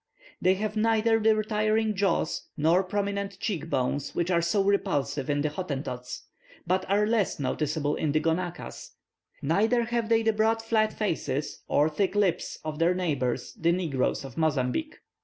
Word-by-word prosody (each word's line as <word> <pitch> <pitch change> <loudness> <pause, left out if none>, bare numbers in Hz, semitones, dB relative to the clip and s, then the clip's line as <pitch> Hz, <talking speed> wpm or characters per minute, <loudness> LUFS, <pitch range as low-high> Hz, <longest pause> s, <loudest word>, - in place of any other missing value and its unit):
They 185 +1 +4
have 210 +2 -3
neither 225 +1 +3
the 220 0 +4
retiring 215 0 +1
jaws 195 0 0
nor 165 +4 +4
prominent 200 0 -2
cheek 170 -7 -3
bones 135 0 -1
which 175 +1 0
are 170 -1 +3
so 180 +4 +1
repulsive 145 -9 0
in 145 0 +1
the 155 - +1
Hottentots, 135 -7 -5 0.4
but 185 +2 0
are 205 +2 +3
less 215 -6 +1
noticeable 150 +2 -1
in 150 - -1
the 155 - +2
Gonaquas, 170 +2 -3 0.5
neither 220 - +2
have 230 -1 -1
they 225 0 +3
the 225 0 +2
broad 220 +1 +2
flat 220 -1 +2
faces 155 -9 -2
and 150 +2 +2
thick 195 +3 0
lips 200 -4 +1
of 155 -1 -5
their 170 +2 +3
neighbours 135 -9 -1
the 165 +1 +1
negroes 160 -7 -1
of 130 -3 -10
Mozambique. 155 - 0
185 Hz, 160 wpm, -27 LUFS, 150-215 Hz, 0.5 s, They